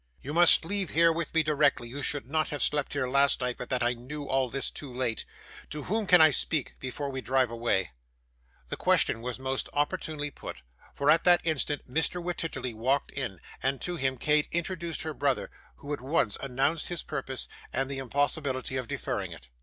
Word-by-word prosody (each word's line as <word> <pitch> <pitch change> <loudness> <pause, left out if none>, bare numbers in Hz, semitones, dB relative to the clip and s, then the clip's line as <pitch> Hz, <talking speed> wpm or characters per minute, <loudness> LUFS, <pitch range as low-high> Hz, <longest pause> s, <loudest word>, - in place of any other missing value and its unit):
You 145 - -6
must 170 0 +7
leave 195 -1 +2
here 165 +1 +4
with 165 -1 -3
me 160 - +5
directly; 150 -5 +2
you 140 +5 -6
should 145 -1 -2
not 155 +2 0
have 145 -3 -1
slept 145 -1 0
here 140 -2 0
last 140 +2 +3
night, 125 -1 -2
but 125 - -6
that 130 -2 0
I 120 +1 +2
knew 130 +5 -7
all 135 -2 0
this 135 +2 0
too 140 -4 -8
late. 125 -2 -2 0.4
To 150 -1 -5
whom 215 - -1
can 180 -1 +8
I 155 -1 +8
speak, 150 0 0
before 140 +2 -4
we 130 -1 -4
drive 130 +1 +1
away?' 115 - 0 0.8
This - - -4
question 115 - +3
was 125 0 -4
most 130 0 -2
opportunely 145 0 -1
put, 65 - -9 0.3
for 140 +1 +3
at 165 - +4
that 175 -1 +6
instant 150 -2 -1
Mr 160 +6 0
Wititterly 170 -7 -3
walked 130 +6 0
in, 115 -10 -4 0.2
and 135 0 0
to 180 - -3
him 135 -4 -1
Kate 150 +3 +2
introduced 170 -1 -2
her 155 -1 -4
brother, 140 -2 0 0.2
who 145 +1 -6
at 145 - -4
once 130 -6 +1
announced 135 +4 0
his 175 -3 -4
purpose, 130 -1 -2 0.2
and 135 0 0
the 135 -1 -4
impossibility 135 0 -1
of 130 -2 -3
deferring - - -3
it. 60 - -11
140 Hz, 200 wpm, -28 LUFS, 130-155 Hz, 0.8 s, can